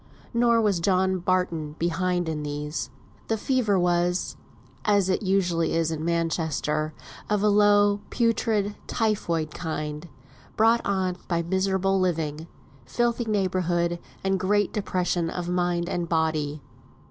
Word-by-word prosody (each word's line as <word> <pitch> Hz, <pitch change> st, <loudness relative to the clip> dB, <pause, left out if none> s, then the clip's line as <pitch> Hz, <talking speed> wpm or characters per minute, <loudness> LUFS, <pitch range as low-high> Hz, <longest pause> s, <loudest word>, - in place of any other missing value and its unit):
Nor 235 Hz, -1 st, +4 dB
was 205 Hz, -5 st, +2 dB
John 190 Hz, +1 st, +2 dB
Barton 170 Hz, -5 st, -1 dB
behind 175 Hz, +1 st, 0 dB
in 155 Hz, -2 st, -2 dB
these. 150 Hz, +1 st, -4 dB, 0.4 s
"The 225 Hz, -, 0 dB
fever" 220 Hz, -4 st, +1 dB
was 175 Hz, 0 st, +1 dB, 0.5 s
(as 200 Hz, -3 st, +3 dB
it 185 Hz, -, +1 dB
usually 180 Hz, -5 st, +1 dB
is 165 Hz, -1 st, +1 dB
in 155 Hz, -1 st, -3 dB
Manchester) 160 Hz, -2 st, -1 dB, 0.3 s
of 210 Hz, -1 st, +1 dB
a 210 Hz, -, +4 dB
low, 205 Hz, 0 st, +4 dB
putrid, 225 Hz, -3 st, +1 dB
typhoid 170 Hz, -9 st, -1 dB
kind; 155 Hz, 0 st, -4 dB, 0.5 s
brought 225 Hz, +2 st, +4 dB
on 190 Hz, -2 st, 0 dB
by 170 Hz, -1 st, 0 dB
miserable 190 Hz, +2 st, +1 dB
living, 160 Hz, -3 st, -1 dB, 0.4 s
filthy 240 Hz, -, 0 dB
neighbourhood, 180 Hz, -4 st, 0 dB, 0.2 s
and 195 Hz, 0 st, +1 dB
great 205 Hz, +1 st, +1 dB
depression 180 Hz, -4 st, -1 dB
of 175 Hz, 0 st, -4 dB
mind 175 Hz, -1 st, 0 dB
and 175 Hz, -2 st, -2 dB
body. 155 Hz, -3 st, 0 dB
180 Hz, 125 wpm, -25 LUFS, 165-200 Hz, 0.5 s, Nor